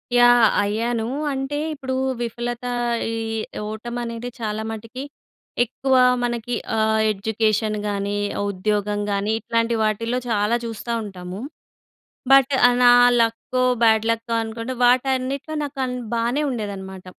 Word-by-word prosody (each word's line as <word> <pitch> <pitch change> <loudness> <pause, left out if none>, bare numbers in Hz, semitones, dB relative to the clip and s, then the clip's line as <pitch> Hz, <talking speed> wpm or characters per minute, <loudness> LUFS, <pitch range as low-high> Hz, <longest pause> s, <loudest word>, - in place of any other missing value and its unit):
Yeah! 245 -1 +7 0.2
అయ్యాను. 225 +2 -1 0.3
అంటే 270 +2 -3 0.2
ఇప్పుడు 265 -3 -4 0.3
విఫలత 240 +1 -4 0.5
ఈ - - -2 0.5
ఓటమనేది 235 +2 -5
చాలా 215 -1 -2
మటికి 230 +4 -7 0.6
ఎక్కువ 260 +3 -1 0.3
మనకి 240 0 -2 0.2
ఆహ్, 220 0 +2
ఎడ్యుకేషన్ 215 +1 0
గాని, 200 0 -2 0.3
ఉద్యోగం 205 +1 -1
గాని 200 +1 0
ఇట్లాంటి 230 0 0
వాటిల్లో 230 +3 0
చాలా 210 +1 +2
చూస్తా 230 +1 -5
ఉంటాము. 185 -1 -7 0.9
బట్ 275 0 +6 0.2
ఆహ్, 245 - +1
నా 245 - +8 0.3
లక్కో 230 +2 0 0.2
బ్యాడ్ 220 -1 +4
లక్కో 230 0 -2
అనుకుంటే 230 +3 -5
వాటన్నిటిలో 260 +4 +1
నాకన్ 265 -3 -3 0.2
బానే 235 +5 0
ఉండేదనమాట. 195 -5 -6
230 Hz, 110 wpm, -22 LUFS, 215-245 Hz, 0.9 s, నా